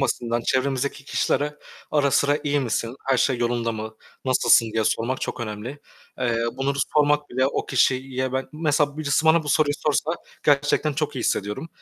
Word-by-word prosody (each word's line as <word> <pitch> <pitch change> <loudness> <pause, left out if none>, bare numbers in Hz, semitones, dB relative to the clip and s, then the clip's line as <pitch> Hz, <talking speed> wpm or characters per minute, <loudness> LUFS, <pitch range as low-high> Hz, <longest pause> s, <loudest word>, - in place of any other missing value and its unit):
basitinden 120 -3 0
çevremizdeki 135 +2 -1
kişilere, 145 +1 0 0.3
ara 145 -2 +2
sıra 145 +2 +2
"İyi 145 0 +1
misin? 115 -1 -2
Her 135 -1 +2
şey 130 -1 +1
yolunda 120 -1 0
mı? 110 0 -6 0.3
Nasılsın?" 120 -3 +4
diye 110 -1 0
sormak 120 +5 0
çok - - -4
önemli. 115 +5 -6 0.4
Eee, 120 -2 0
bunları 140 +1 -1 0.2
sormak 150 0 +3
bile 130 +1 +1
o 140 - -2
kişiyi 130 0 +1
ben 130 0 -2
mesela 150 -2 +1
birisi 155 0 +1
bana 160 +1 +5
bu 150 - -7
soruyu 145 0 +3
sorsa 150 +1 +1 0.3
gerçekten 145 +1 +2
çok 150 -1 -2
iyi - - -2
hissediyorum. 105 +10 -2
135 Hz, 170 wpm, -23 LUFS, 120-145 Hz, 0.4 s, bana